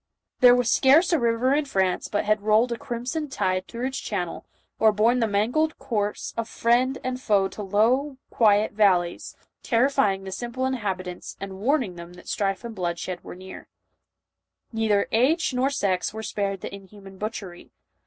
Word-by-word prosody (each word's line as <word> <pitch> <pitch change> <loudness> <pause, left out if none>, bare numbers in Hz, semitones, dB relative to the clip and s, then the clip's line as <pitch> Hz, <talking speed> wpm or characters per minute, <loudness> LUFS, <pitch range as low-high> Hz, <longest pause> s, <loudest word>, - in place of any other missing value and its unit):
There 245 -1 +8
was 245 -1 +1
scarce 310 +7 +5
a 330 - +3
river 235 +2 +2
in 295 +1 +1
France 190 -8 0
but 205 - -1
had 215 0 +2
rolled 220 +3 +3
a - - 0
crimson 260 +5 -4
tide 185 -6 -1
through 235 +2 -5
its 265 +1 -3
channel, 180 -5 -4 0.3
or 220 -1 +5
borne 225 +4 +2
the 225 - +2
mangled 240 +10 0
corse 215 -6 -3
of 230 0 -3
friend 250 +3 +1
and 255 0 -3
foe 200 -4 +2
to 210 - -8
low, 240 +8 +1
quiet 210 -2 +3
yvalleys, 185 -5 +1 0.3
terrifying 230 -6 +2
the 190 - -7
simple 240 +6 -4
inhabi 210 -8 -2
tants 180 -1 -8
and 195 -1 -7
warning 240 - 0
them 170 +1 -10
that 180 - -15
strife 195 -1 -1
and 235 -1 -6
bloodshed 180 -1 -4
were - - -9 1.4
Neither 220 -2 +1
age 275 +7 +2
nor 255 +2 +1
sex 200 -7 -1
were 220 - -5
spared 200 -3 -3
the - - -7
inhuman 195 0 -12
near. 190 - -17
butchery. 205 -5 -6
220 Hz, 175 wpm, -25 LUFS, 195-250 Hz, 1.4 s, There